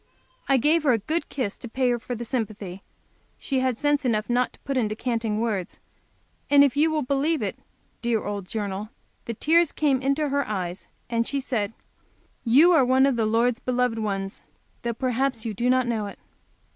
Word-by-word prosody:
I 270 - +5
gave 310 +6 +3
her 280 -4 +3
a - - +3
good 310 +11 -2
kiss 240 -7 -3
to 240 - -8
pay 255 +1 +1
her 240 - 0
for 245 +1 -5
the 240 +1 -5
sympathy 215 -6 -4 0.6
she 270 -2 -1
had 255 -2 0
sense 290 +1 +1
enough 225 -2 0
not 245 +1 +1
to - - -20
put 275 - -3
into 215 -4 0
canting 225 -2 -1
words, 210 -6 -2 0.7
and 285 0 +7
if 280 -1 +2
you 305 +3 +4
will 310 -2 0
believe 280 +1 0
it, 200 - -2 0.5
dear 235 -2 0
old 205 -2 -4
Journal, 205 -1 -4 0.4
the 230 - -4
tears 330 +5 +3
came 275 -4 +1
into 275 +2 +1
her 280 0 0
eyes, 185 -3 -4 0.2
and 230 -1 0
she 280 - -1
said: 225 -5 -2 0.7
"You 280 +9 +6
are 320 -6 +5
one 260 +1 +4
of 275 -2 +2
the 225 -2 +1
Lord's 230 +2 +2
beloved 250 -3 0
ones, 195 -2 -3 0.4
though 235 -1 -2
perhaps 255 -1 -1
you 220 - -2
do 240 +5 0
not 255 0 +3
know 225 -3 -1
it." 200 - -9
245 Hz, 195 wpm, -25 LUFS, 220-275 Hz, 0.7 s, and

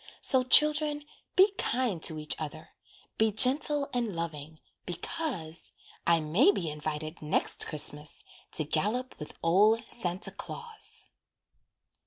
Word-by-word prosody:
So 260 - +6
children, 300 +2 +3 0.3
be 385 +2 +4
kind 235 -9 -2
to 160 - +2
each 150 -1 +3
other, 155 0 -8 0.5
Be 220 0 +2
gentle 280 +6 +4
and 235 -6 -3
loving 155 -2 -7 0.2
because 175 - -5 0.4
I 170 -1 +3
may 175 - +2
be 165 - -4
invited 155 +2 -7
next 150 0 0
Christmas 150 0 +3 0.3
To 155 - +1
gallop 215 - -2
with 150 - -10
old 210 +7 +2
Santa 180 -4 -3
Claus. 465 -2 -5
190 Hz, 120 wpm, -27 LUFS, 155-260 Hz, 0.5 s, So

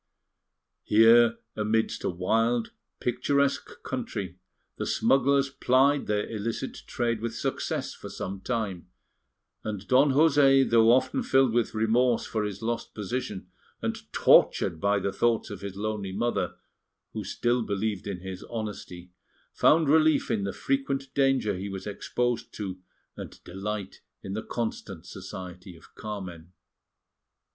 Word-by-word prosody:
Here, 115 +2 +6 0.2
amidst 110 +1 0
a - - 0
wild, 115 +6 +1 0.3
picturesque 140 +3 0
country, 90 -3 -4 0.4
the - - -3
smugglers 135 +1 +3
plied 135 +2 +3
their 105 0 0
illicit 115 +1 -4
trade 115 -2 -1
with 115 0 -3
success - - -2
for - - -10
some 95 +1 -5
time; 105 -8 -3 0.8
and 105 -2 -5
Don 135 +3 +5
José, 140 -3 +5
though 115 -1 +5
often 130 +1 +2
filled 135 -3 +3
with 120 -1 0
remorse 115 +2 +2
for 110 -2 -2
his 100 0 -6
lost 115 0 -3
position, 105 -1 -4 0.3
and - - -5
tortured 80 - +4
by 100 0 +3
the 100 0 -2
thoughts 115 +3 +1
of - - -7
his 100 -1 -6
lonely 105 -1 -3
mother, 120 +5 -1 0.6
who 110 - -4
still 120 +5 0
believed 100 -2 -2
in 95 -3 -4
his 95 -1 -7
honesty, 105 -6 -6 0.4
found 160 0 +4
relief 155 +1 +4
in 100 -3 0
the 100 - -2
frequent 135 +3 -2
danger 135 -7 +2
he 95 +2 -5
was 95 -1 -6
exposed 120 +4 -2
to, 95 -3 -5 0.4
and - - -10
delight 100 +1 -5 0.2
in 95 - -5
the 110 - -2
constant 110 -8 -5
society 90 -1 -9
of 80 - -18
Carmen. 95 -5 -7
110 Hz, 135 wpm, -27 LUFS, 100-125 Hz, 0.8 s, Here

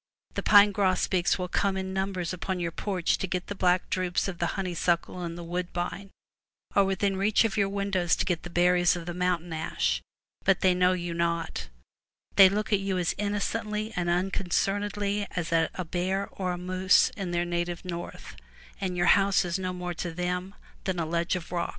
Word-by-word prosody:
The - - -2
pine 205 0 +7
grosbeaks 185 -2 +1
will 180 -1 -3
come 195 +2 0
in 190 0 -3
numbers 190 -2 -2
upon 185 +1 -3
your 170 -1 -2
porch 185 0 -1
to 190 - -2
get 180 0 -2
the - - -5
black 180 -2 +2
drupes 185 0 0
of 180 -3 -5
the 170 - +1
honey 185 -2 -2
suckle 175 +1 0
and 170 -1 -5
the 175 - -7
woodbine, 175 +3 -4 0.7
or 200 - +5
within 195 0 0
reach 205 +3 +3
of 220 -4 0
your 200 -2 +2
windows 195 -3 +1
to - - -1
get 175 -3 -1
the 175 - -8
berries 175 0 +3
of 170 -1 -6
the 175 - -4
mountain 175 -1 -1
ash, 65 - -1 0.4
but 195 -1 +3
they 185 -1 +5
know 180 0 +3
you 175 -2 -3
not; 170 0 -2 0.7
they 195 -1 +9
look 210 +2 -1
at 200 - +4
you 195 -1 -1
as 175 -2 0
innocently 210 +1 -2
and 175 -2 -1
unconcernedly 200 +3 0
as 170 -1 -2
at 165 -1 +3
a 185 - -3
bear 185 +4 -1
or 180 -2 -3
moose 185 +1 +3
in 195 -3 -4
their 175 0 0
native 175 0 -3
north, 175 -1 -7 0.4
and 185 -2 -2
your 175 - +2
house 195 0 +4
is 175 +1 -2
no 185 -1 -2
more 180 -1 -4
to 175 0 -4
them 180 +3 -3 0.3
than 190 -2 -1
a 165 - 0
ledge 170 +2 0
of 175 -2 -6
rocks. 175 -1 -1
180 Hz, 200 wpm, -28 LUFS, 175-195 Hz, 0.7 s, they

